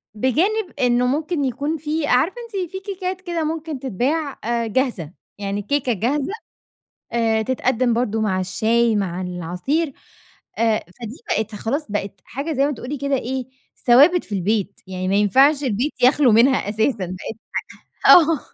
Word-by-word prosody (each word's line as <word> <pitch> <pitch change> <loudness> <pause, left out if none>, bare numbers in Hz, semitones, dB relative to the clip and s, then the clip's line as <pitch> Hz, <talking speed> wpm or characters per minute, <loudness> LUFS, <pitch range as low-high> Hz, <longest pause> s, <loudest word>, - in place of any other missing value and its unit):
بجانب 350 - +1
إنه 245 0 +3
ممكن 300 +3 -1
يكون 285 +5 -2
في 305 0 -2
عارفة 275 - +2
أنتِ 385 -7 -4
في 380 - -5
كيكات 375 -1 -5
كده 345 -3 -2
ممكن 315 -2 -3
تتباع 275 - -2
آآ 235 0 -1
جاهزة، 220 - -1 0.3
يعني 200 0 -3
الكيكة 255 +4 0
جاهزة 265 - -1 0.8
آآ 225 -2 +1
تتقدّم 255 0 +1
برضه 225 -2 0
مع 190 -4 0
الشاي 225 +4 +1
مع 185 -3 -2
العصير 180 - -2 0.7
آآ 225 -1 +3 0.2
فدي 235 +2 -8 0.2
بقت 220 0 -3
خلاص، 275 +9 -2
بقت 200 -2 -4
حاجة 285 +5 -4
زي 275 -1 +2
ما 295 - -1
تقولي 275 +3 -6
كده 280 0 -1
إيه 260 +1 -3 0.4
ثوابت 290 +9 +6
في 210 - -6
البيت 200 +1 -1
يعني 185 0 -4
ما 195 - +1
ينفعش 270 +9 +4
البيت 250 +4 0
يخلو 255 0 +5
منها 235 0 +4
أساسا 220 -2 0
بقت 185 +5 -7 0.7
حاجة - - +11
آه. 325 -4 +1
250 Hz, 155 wpm, -21 LUFS, 215-295 Hz, 0.8 s, حاجة